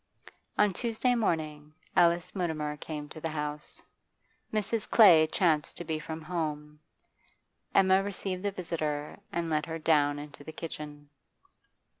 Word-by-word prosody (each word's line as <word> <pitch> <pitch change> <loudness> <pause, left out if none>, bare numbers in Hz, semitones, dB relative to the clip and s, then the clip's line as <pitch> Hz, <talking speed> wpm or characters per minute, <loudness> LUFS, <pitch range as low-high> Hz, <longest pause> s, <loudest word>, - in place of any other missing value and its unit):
On 210 -2 +4
Tuesday 235 +4 +1
morning 155 -9 -1 0.2
Alice 175 +1 +3
Mutimer 155 -5 -1
came 150 0 -6
to 155 - -10
the 165 - -2
house. 150 -1 -4 0.7
Mrs. 215 +1 -1
Clay 170 -8 +8
chanced 160 -2 +1
to - - -4
be 160 -1 -2
from 160 +1 -6
home; 150 -3 -3 1.0
Emma 190 0 +6
received 195 -2 -3
the 205 - 0
visitor 155 -5 -3
and 170 -1 -1
led 155 0 0
her 165 0 -3
down 150 -2 +3
into 145 0 -9
the 160 - -8
kitchen. 150 -3 -7
160 Hz, 135 wpm, -30 LUFS, 150-185 Hz, 1.0 s, Clay